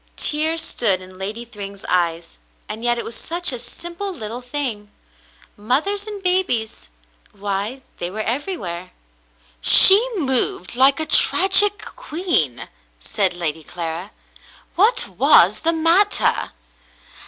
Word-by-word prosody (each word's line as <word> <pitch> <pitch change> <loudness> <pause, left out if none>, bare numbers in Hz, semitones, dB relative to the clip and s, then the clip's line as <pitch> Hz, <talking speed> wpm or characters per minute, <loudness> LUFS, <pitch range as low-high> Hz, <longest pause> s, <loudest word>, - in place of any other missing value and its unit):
Tears 315 +2 +1
stood 200 -6 -1
in 185 0 -14
Lady 215 +5 -5
Thryng's 200 -3 -10
eyes, 170 -2 -2 0.3
and 215 +2 -8
yet 240 0 +2
it - - -5
was 230 - -7
such 345 +5 0
a 250 - -5
simple 345 +11 -6
little 235 - -7
thing. 245 -6 -5 0.7
Mothers 310 - -1
and 410 -2 -8
babies? 360 - -1 0.4
Why, 205 +6 -5
they 175 - -4
were 215 +4 -6
everywhere. 220 - -5 0.4
" - - -39 0.3
She 390 - +9
moved 260 - -2
like 270 +3 +4
a 315 - -1
tragic 390 +5 +3
queen," 325 - -3 0.3
said 185 - -1
Lady 160 -2 -4
Clara. 170 +3 -7 0.7
"What 425 +7 +3
was - - +3
the 330 - 0
matter 330 +5 +2
240 Hz, 125 wpm, -19 LUFS, -, 0.7 s, She